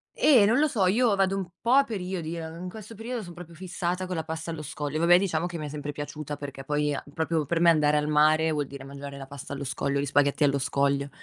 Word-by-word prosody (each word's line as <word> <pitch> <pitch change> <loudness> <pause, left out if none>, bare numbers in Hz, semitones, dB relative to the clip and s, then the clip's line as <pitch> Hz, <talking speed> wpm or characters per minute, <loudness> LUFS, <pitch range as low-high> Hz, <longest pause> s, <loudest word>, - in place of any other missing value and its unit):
Eh, 250 -9 +6
non 230 +6 +3
lo 305 - +4
so, 215 -9 +1
io 220 +3 +3
vado 195 0 +2
un 190 -2 -3
po' 235 - -1
a 275 +2 +7
periodi, 180 -7 -4
eh, 165 -1 -5
in 170 +3 -7
questo 215 +3 -10
periodo 225 +1 -5
son 175 - -10
proprio 170 -1 -11
fissata 180 +1 -3
con 185 0 -4
la 160 - -2
pasta 160 +1 -5
allo 160 -2 -5
scoglio. 150 0 -4
Vabbè, 170 +1 +6
diciamo 175 -3 0
che 175 -1 -6
mi 155 - -5
è - - -5
sempre 145 0 -5
piaciuta 145 0 -6
perché 140 -1 -7
poi, 150 +1 0
uhm, 145 0 -6
proprio 160 -1 0
per 165 +3 0
me 170 0 +6
andare 150 -2 +3
al 150 0 0
mare 155 +1 +4
vuol 145 -3 -1
dire 140 -1 -9
mangiare 140 0 -8
la 135 - -7
pasta 140 0 -8
allo 140 - -5
scoglio, 140 +1 -1
gli 140 - 0
spaghetti 145 +1 +2
allo 140 -1 +3
scoglio. 140 0 0
160 Hz, 260 wpm, -27 LUFS, 145-185 Hz, -, a